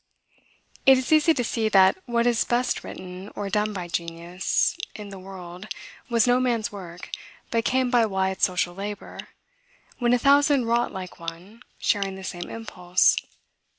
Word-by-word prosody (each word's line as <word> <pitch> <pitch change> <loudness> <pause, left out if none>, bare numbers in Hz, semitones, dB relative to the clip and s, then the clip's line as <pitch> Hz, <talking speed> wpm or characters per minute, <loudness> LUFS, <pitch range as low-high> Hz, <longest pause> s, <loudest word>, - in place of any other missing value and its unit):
It 265 0 +9
is 260 +3 -3
easy 310 +1 +5
to 245 - 0
see 225 -1 0
that 190 -2 +6
what 235 -1 +1
is 240 -2 +3
best 245 +1 0
written 185 +2 -8
or 200 -1 -4
done 210 0 +1
by 180 -4 -5
genius, 170 +2 -1 0.2
in 210 -1 -8
the 195 -1 -9
world, 185 0 -9 0.4
was 230 -2 +3
no 245 0 +4
man's 235 -3 0
work, 180 -4 -9 0.4
but 230 0 +1
came 255 0 +2
by 235 -3 +4
wide 190 -1 -1
social 180 -1 +2
labor, 200 +2 -7 0.8
when 240 -1 +3
a - - +5
thousand 280 0 +4
wrought 235 +1 +1
like 185 -2 -8
one, 170 +7 -8 0.2
sharing 195 -2 0
the 190 - -9
same 175 -1 -5
impulse. 185 -5 +2
205 Hz, 160 wpm, -25 LUFS, 185-240 Hz, 0.8 s, It